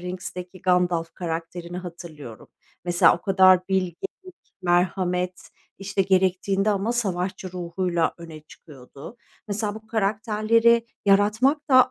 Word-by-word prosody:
Rings'teki 180 Hz, 0 st, -7 dB
Gandalf 180 Hz, -2 st, +1 dB
karakterini 170 Hz, +1 st, -5 dB
hatırlıyorum. 165 Hz, -, -10 dB, 0.4 s
Mesela 175 Hz, 0 st, +4 dB
o -, -, -14 dB
kadar 185 Hz, -1 st, +5 dB
bilgelik, 185 Hz, -3 st, 0 dB, 0.7 s
merhamet, 180 Hz, +1 st, 0 dB, 0.3 s
işte, 195 Hz, 0 st, -1 dB
gerektiğinde 190 Hz, +2 st, +1 dB
ama 205 Hz, +3 st, 0 dB
savaşçı 185 Hz, -5 st, -2 dB
ruhuyla 175 Hz, -1 st, -1 dB
öne 165 Hz, -2 st, -10 dB
çıkıyordu. 145 Hz, -, -13 dB, 0.3 s
Mesela 205 Hz, 0 st, -2 dB
bu 220 Hz, 0 st, -11 dB
karakterleri 220 Hz, +2 st, +2 dB, 0.2 s
yaratmak 220 Hz, +10 st, +3 dB
da 255 Hz, -1 st, +6 dB
185 Hz, 105 wpm, -24 LUFS, 175-205 Hz, 0.7 s, da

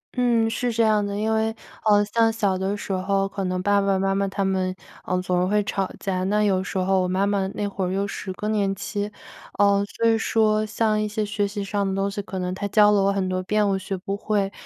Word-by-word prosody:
嗯， 240 Hz, -3 st, +2 dB
是 235 Hz, +2 st, -1 dB
这 230 Hz, 0 st, +2 dB
样 215 Hz, -1 st, +3 dB
的， 200 Hz, 0 st, -3 dB
因 220 Hz, +1 st, 0 dB
为 220 Hz, 0 st, 0 dB, 0.3 s
呃 205 Hz, -1 st, +5 dB
像 225 Hz, -1 st, +4 dB
小 205 Hz, -4 st, 0 dB
的 190 Hz, +2 st, -2 dB
时 200 Hz, -, -4 dB
候 195 Hz, +1 st, 0 dB
可 195 Hz, 0 st, -4 dB
能 185 Hz, 0 st, -1 dB
爸 205 Hz, 0 st, +3 dB
爸 195 Hz, -1 st, +1 dB
妈 195 Hz, 0 st, +1 dB
妈 195 Hz, 0 st, 0 dB
他 195 Hz, 0 st, -2 dB
们， 185 Hz, -1 st, 0 dB, 0.3 s
嗯， 180 Hz, -, +1 dB
总 180 Hz, -1 st, +1 dB
是 180 Hz, -, +1 dB
会 210 Hz, +1 st, +2 dB
吵 195 Hz, -2 st, -2 dB
架。 185 Hz, -2 st, -2 dB
那 210 Hz, +2 st, +2 dB
有 190 Hz, -2 st, +2 dB
时 195 Hz, -, -5 dB
候 190 Hz, 0 st, +2 dB
我 180 Hz, -, 0 dB
妈 185 Hz, +2 st, +1 dB
妈 200 Hz, -1 st, 0 dB
那 205 Hz, -, -1 dB
会 195 Hz, -1 st, -4 dB
儿 180 Hz, -, -2 dB
又 195 Hz, +1 st, -1 dB
是 195 Hz, -1 st, -5 dB
更 210 Hz, +3 st, -3 dB
年 200 Hz, -2 st, +1 dB
期， 205 Hz, +1 st, -4 dB, 0.5 s
呃， 200 Hz, 0 st, +4 dB
所 230 Hz, -, +2 dB
以 225 Hz, -, +4 dB
说 215 Hz, -1 st, +2 dB
像 215 Hz, 0 st, +1 dB
一 215 Hz, -, 0 dB
些 210 Hz, 0 st, -2 dB
学 205 Hz, 0 st, -1 dB
习 200 Hz, 0 st, -4 dB
上 200 Hz, 0 st, -1 dB
的 190 Hz, -, -2 dB
东 195 Hz, +1 st, 0 dB
西， 205 Hz, -, -4 dB
可 195 Hz, -1 st, -7 dB
能 180 Hz, 0 st, -2 dB
她 200 Hz, +2 st, -3 dB
教 210 Hz, +1 st, +5 dB
了 205 Hz, -, +3 dB
我 195 Hz, 0 st, +3 dB
很 195 Hz, -1 st, -1 dB
多 185 Hz, 0 st, -1 dB
遍， 210 Hz, +2 st, +1 dB
我 195 Hz, -, +1 dB
学 190 Hz, 0 st, -4 dB
不 195 Hz, +2 st, -4 dB
会。 205 Hz, -1 st, -1 dB
200 Hz, 280 characters per minute, -24 LUFS, 190-210 Hz, 0.5 s, 呃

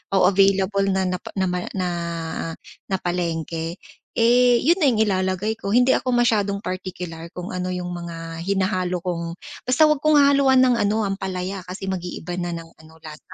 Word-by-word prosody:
o 195 Hz, 0 st, +5 dB
available 195 Hz, 0 st, +3 dB
napa 185 Hz, -1 st, -1 dB
nama 180 Hz, -2 st, -1 dB
na 185 Hz, -2 st, -1 dB, 1.0 s
napalengke, 170 Hz, -3 st, -2 dB, 0.4 s
eh, 240 Hz, +1 st, +4 dB
yun 335 Hz, +6 st, +3 dB
na 340 Hz, -, +2 dB
yung 220 Hz, -, +1 dB
ilalagay 190 Hz, +1 st, 0 dB
ko. 200 Hz, -1 st, -3 dB
Hindi 245 Hz, +2 st, +4 dB
ako 255 Hz, -, -2 dB
masyadong 210 Hz, -5 st, +2 dB
partikular 180 Hz, -4 st, -6 dB
kung 180 Hz, 0 st, -6 dB
ano 180 Hz, 0 st, -3 dB
yung 180 Hz, -1 st, -4 dB
mga 165 Hz, -1 st, -7 dB
hinahalo 185 Hz, -2 st, 0 dB
kong 170 Hz, -2 st, -3 dB, 0.3 s
basta 265 Hz, +5 st, +4 dB
huwag 305 Hz, -, +3 dB
kong 305 Hz, -1 st, +6 dB
hahaluan 275 Hz, -2 st, +5 dB
ng 250 Hz, -2 st, +4 dB
ano, 215 Hz, +1 st, +1 dB
ampalaya 190 Hz, -2 st, -3 dB
kasi 190 Hz, +1 st, -6 dB
mag-iiba 180 Hz, -1 st, -4 dB
na 175 Hz, -1 st, -2 dB
ng 165 Hz, -1 st, -7 dB
ano 160 Hz, 0 st, -17 dB
lasa. 155 Hz, +3 st, -11 dB
190 Hz, 160 wpm, -22 LUFS, 175-215 Hz, 1.0 s, kong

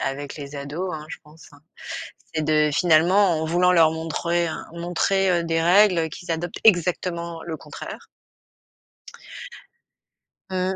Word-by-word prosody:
avec 140 Hz, +1 st, -4 dB
les 145 Hz, -1 st, -8 dB
ados, 150 Hz, +7 st, -4 dB
hein, 150 Hz, -1 st, -7 dB
je -, -, -8 dB
pense, 155 Hz, 0 st, -18 dB
hein. 145 Hz, -, -18 dB, 0.7 s
C'est 155 Hz, -, 0 dB
de 150 Hz, 0 st, +2 dB
finalement 175 Hz, +2 st, +3 dB
en -, -, -1 dB
voulant 175 Hz, +3 st, +3 dB
leur 165 Hz, -3 st, +5 dB
montrer 165 Hz, +2 st, -1 dB
un 160 Hz, -, -6 dB
montrer, 175 Hz, +3 st, 0 dB
heu, 170 Hz, -1 st, +1 dB
des 165 Hz, 0 st, 0 dB
règles 180 Hz, -2 st, +4 dB
qu'ils 170 Hz, +2 st, -9 dB
adoptent 170 Hz, +1 st, -4 dB
exactement 170 Hz, -4 st, +1 dB
le 165 Hz, -2 st, -5 dB
contraire. -, -, -9 dB, 2.4 s
Mmh. 185 Hz, 0 st, -1 dB
170 Hz, 140 wpm, -23 LUFS, 155-180 Hz, 2.4 s, leur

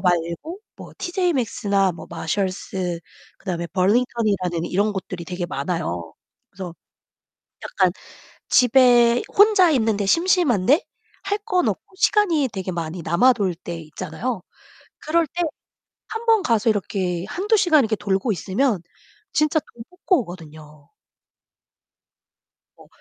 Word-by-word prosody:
말고 175 Hz, -, -1 dB, 0.2 s
뭐 -, -, -11 dB
티제이맥스나 250 Hz, -, 0 dB
뭐 165 Hz, -, -10 dB
마샬스 185 Hz, 0 st, -3 dB, 0.4 s
그다음에 170 Hz, -2 st, -4 dB
벌링턴이라는 195 Hz, -3 st, +1 dB
이런 205 Hz, +4 st, 0 dB
곳들이 185 Hz, -3 st, -6 dB
되게 180 Hz, 0 st, -4 dB
많아요. 90 Hz, -, -3 dB, 0.4 s
그래서 180 Hz, -2 st, -8 dB, 0.9 s
약간 -, -, +1 dB, 0.6 s
집에 245 Hz, -1 st, +5 dB, 0.2 s
혼자 410 Hz, -4 st, +6 dB
있는데 220 Hz, -6 st, +1 dB
심심한데 315 Hz, -, +3 dB, 0.4 s
할 400 Hz, +1 st, -1 dB
건 365 Hz, -5 st, +1 dB
없고 380 Hz, -, -4 dB
시간이 345 Hz, -11 st, +3 dB
되게 190 Hz, -1 st, -4 dB
많이 170 Hz, 0 st, -4 dB
남아돌 200 Hz, +3 st, +3 dB
때 170 Hz, 0 st, -7 dB
있잖아요. 180 Hz, +7 st, -5 dB, 0.6 s
그럴 325 Hz, +1 st, +1 dB
때 350 Hz, +5 st, -4 dB, 0.7 s
1 450 Hz, +1 st, -5 dB
번 450 Hz, -2 st, +4 dB
가서 225 Hz, -1 st, +2 dB
이렇게 185 Hz, -4 st, -2 dB
1-2 410 Hz, -, +1 dB
시간 320 Hz, -6 st, +4 dB
이렇게 220 Hz, -3 st, 0 dB
돌고 200 Hz, +3 st, -1 dB
있으면 205 Hz, +2 st, 0 dB, 0.5 s
진짜 305 Hz, +2 st, +2 dB
돈 235 Hz, -5 st, -9 dB
뽑고 360 Hz, -3 st, +1 dB
오거든요. 155 Hz, -6 st, -11 dB, 1.9 s
어. -, -, -17 dB
210 Hz, 255 characters per minute, -22 LUFS, -, 1.9 s, 혼자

